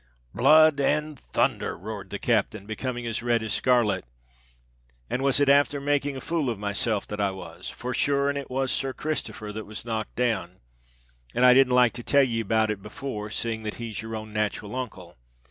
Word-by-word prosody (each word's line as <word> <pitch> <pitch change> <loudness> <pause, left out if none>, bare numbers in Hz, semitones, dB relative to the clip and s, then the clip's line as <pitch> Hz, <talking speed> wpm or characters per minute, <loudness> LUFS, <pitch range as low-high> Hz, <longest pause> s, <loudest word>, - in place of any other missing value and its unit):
"Blood 155 +3 +6
and 150 +2 +1
thunther!" - - -1
roared 100 0 -7
the 100 - -4
captain, 105 -2 0
becoming 120 +3 -4
as 115 0 -2
red 120 -1 +1
as 110 - -2
scarlet; 115 -7 +2 1.1
"and 125 - -1
was 135 0 +3
it 145 - +3
afther 145 +1 +4
making 145 0 0
a - - -7
fool 165 -4 -1
of 115 - -2
myself 105 +1 -1
that 105 0 -4
I 100 - +2
was? 95 0 -8
For 125 +1 -5
sure 140 +1 +2
and 140 - 0
it 140 -1 -5
was 130 +1 -1
Sir 135 -1 -1
Christopher 110 -9 -4
that 110 0 -6
was 110 +2 -8
knocked 110 -2 -3
down—and - - -3
I 125 - +9
didn't 130 -1 +5
like 125 -2 +5
to 120 0 -6
tell 140 +3 +4
ye 115 -3 0
about 110 0 +1
it 100 -2 -5
before, 105 0 -6
seeing 110 +1 -1
that 110 -1 -4
he's 115 -4 -5
your 110 0 -6
own 110 -1 -7
nat'ral 105 +1 -2
uncle. 95 - -6
115 Hz, 195 wpm, -26 LUFS, 105-135 Hz, 1.1 s, I